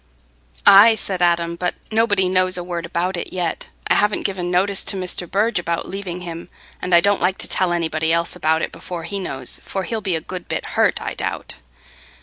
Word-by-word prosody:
"Aye," 215 +3 +8
said 190 -3 -3
Adam, 170 -1 +2
"but 180 +1 -2 0.2
nobody 205 -4 +2
knows 185 0 +3
a 175 - -4
word 170 -1 -5
about 180 +1 -2
it - - -5
yet. 175 -3 -3 0.2
I - - +3
haven't 210 0 +2
given 185 -3 -2
notice 190 +2 +1
to 195 - -1
Mr. 180 -2 0
Burge 210 +1 +1
about 170 -1 -3
leaving 185 -2 -6
him, 170 0 -8 0.3
and 180 -1 +2
I 170 - +6
don't 200 +2 +2
like 185 +2 +1
to - - -1
tell 185 -2 +1
anybody 160 -2 0
else 170 0 0
about 160 +1 +1
it - - -3
before 170 0 -7
he 200 +5 -4
knows, 190 - +1
for 195 - -4
he'll 220 +4 -3
be 190 -4 -1
a - - -1
good 180 +1 -8
bit - - -3
hurt, - - +2
I - - -5
doubt. - - -5
180 Hz, 210 wpm, -20 LUFS, 170-195 Hz, 0.3 s, Aye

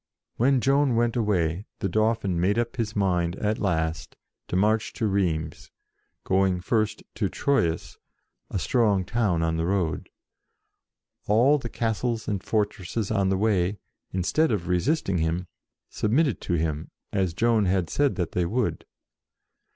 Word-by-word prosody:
When 130 +2 +3
Joan 135 -1 +3
went 115 0 +1
away, 95 -5 0
the - - -2
Dauphin 110 -2 +1
made 100 +4 +2
up 120 0 -1
his 110 -3 -2
mind 90 -3 +1
at 105 +2 -1
last 80 -5 -1 0.3
to - - -3
march 105 +3 +2
to 115 - -2
Rheims, 85 -6 -1 0.5
going 95 -1 +2
first 110 +2 -1
to 100 -4 -1
Troyes, 110 -13 0 0.5
a - - -2
strong 100 -2 +2
town 100 -8 0
on 80 0 0
the 80 - 0
road. 90 -5 -1 1.2
All 125 +8 +4
the 120 - -6
castles 115 0 -2
and 100 -3 -2
fortresses 105 0 -1
on 100 -3 +2
the 95 - +1
way, 100 -2 +1 0.3
instead 110 - +1
of 95 -6 -1
resisting 95 - +1
him, 80 +3 -1 0.4
submitted 125 +4 +1
to 90 - -2
him, 80 -2 -1 0.2
as 95 -4 0
Joan 115 -1 +3
had 90 -2 +1
said 145 - +1
that 90 -4 -2
they 90 -1 0
would. 120 +5 -1
100 Hz, 145 wpm, -26 LUFS, 90-115 Hz, 1.2 s, All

